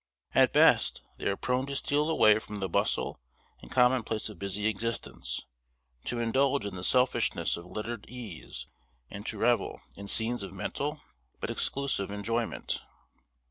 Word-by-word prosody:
At - - +5
best, - - +5 0.2
they - - -1
are 100 - +1
prone 125 +2 0
to 140 - -3
steal 150 +2 +1
away 110 -9 +6
from 105 - -8
the 95 -1 -1
bustle 85 - 0 0.4
and - - -12
commonplace 125 -4 +2
of 105 -5 -11
busy 100 +1 -2
existence; 105 - -2 0.6
to 120 - -1
indulge 130 +3 +2
in 100 - -4
the 90 - -6
selfishness 125 +6 +3
of 85 +1 -9
lettered 110 +2 -5
eas; 105 - -7 0.5
and - - -7
to - - -3
revel - - +2 0.2
in 100 0 -8
scenes 115 +3 +2
of 95 -1 -6
mental, 145 +10 -3 0.4
but - - -2
exclusive 135 -8 0
enjoyment. 115 +3 -2
110 Hz, 150 wpm, -30 LUFS, 100-125 Hz, 0.6 s, away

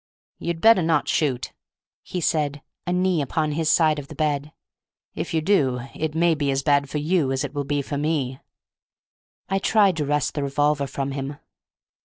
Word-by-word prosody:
"You'd 170 -1 -3
better 225 -4 +6
not 160 -2 +1
shoot," 135 -6 0 0.5
he 180 - -5
said, 145 -3 0 0.2
a - - 0
knee 180 -2 +2
upon 155 +2 -1
his 160 +1 0
side 155 -2 +3
of 140 - -9
the - - -10
bed; 150 -1 -1 0.6
"if - - -4
you 160 - +1
do 140 -9 +2
it 155 -1 -3
may 170 0 +3
be 145 -2 -1
as 135 0 0
bad 140 -1 +2
for 150 - -3
you 150 -2 +1
as 135 +1 -1
it 145 -1 -5
will 145 -1 -2
be 145 0 -1
for 145 +1 -4
me!" 145 -4 -1 1.1
I 195 +1 0
tried 200 -3 +3
to 150 - -1
wrest 145 -1 0
the 145 - -2
revolver 140 0 +1
from 135 0 -3
him. 140 +1 -5
150 Hz, 190 wpm, -23 LUFS, 140-165 Hz, 1.1 s, better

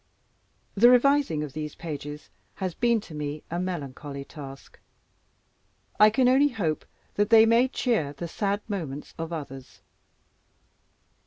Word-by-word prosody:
The 235 +4 +6
revising 250 - +3
of 145 -3 -7
these 150 0 -5
pages 150 -2 -7 0.2
has 185 -3 -3
been 235 +1 +2
to 175 - -12
me 150 0 -5
a 170 - -1
melancholy 145 -5 -5
task. 135 -3 -11 1.2
I 215 - +8
can 245 +4 +2
only 270 +3 +5
hope 180 - -2 0.3
that 205 +1 +1
they 225 -1 +8
may 230 +3 +4
cheer 230 - 0
the 170 +4 -6
sad 200 +4 -2
moments 155 -9 -5
of 165 0 -4
others. 135 - -8
170 Hz, 135 wpm, -26 LUFS, 145-225 Hz, 1.2 s, I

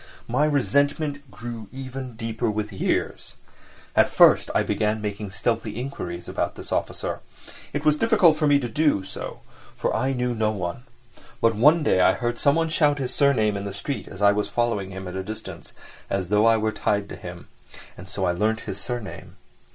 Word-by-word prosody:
My 130 +6 +2
resentment 145 0 +1
grew 115 -3 -7
even 130 -2 -7
deeper 115 0 -2
with 105 0 -3
years. 95 - -2 0.6
At - - +5
first - - +5
I - - +4
began 110 0 0
making 105 -1 -4
stealthy 110 +2 -2
inquiries 90 -10 -5
about - - -2
this - - -8
officer. - - -2 0.5
It 145 +1 -3
was 150 0 +4
difficult 210 -7 +5
for 155 -1 +1
me 145 0 +5
to 130 -3 -2
do 145 -4 +2
so, - - -7 0.3
for - - -1
I 135 +1 +1
knew 125 -1 -1
no 110 -2 +1
one. 100 +3 -4 0.5
But 115 0 +3
one 150 +9 +5
day 95 - +3
I 95 - +5
heard 120 0 -2
someone 160 +3 +3
shout 150 -2 +3
his 130 -2 -3
surname 115 -8 +3
in 100 0 -4
the 100 - -4
street 135 +8 -4
as 100 +1 -6
I 100 - +7
was 105 0 -1
following 115 -5 0
him 95 0 -7
at 90 - -6
a 95 - -2
distance, 95 -5 -8 0.4
as 95 -2 -2
though 105 +2 +4
I 115 0 +5
were 110 0 0
tied 105 -1 0
to - - -6
him—and 90 +1 -12
so 100 -2 -2
I 90 - +2
learnt 110 +5 0
his 95 - -6
surname. 120 -2 -6
115 Hz, 190 wpm, -24 LUFS, 100-140 Hz, 0.6 s, I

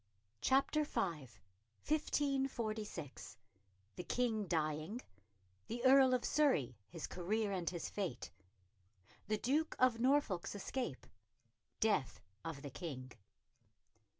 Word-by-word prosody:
CHAPTER 275 +3 +3
V 290 - -2
1546 205 - -2 0.6
The 180 - -4
King 220 -2 0
dying 155 +6 -1 0.7
The 240 +2 -3
Earl 260 -1 +7
of 250 - -1
Surrey 260 - +3
His 165 -2 -5
career 205 +4 -1
and 180 -4 -1
his 170 -2 -4
fate 180 -12 -3 1.0
The 215 +1 +1
Duke 295 +8 +1
of 250 -3 +4
Norfolk's 250 -9 +2
escape 205 - -3 0.7
Death 210 - +1 0.2
of 155 -3 -5
the 140 - -6
King. 130 -5 -6
210 Hz, 100 wpm, -37 LUFS, 155-255 Hz, 1.0 s, Earl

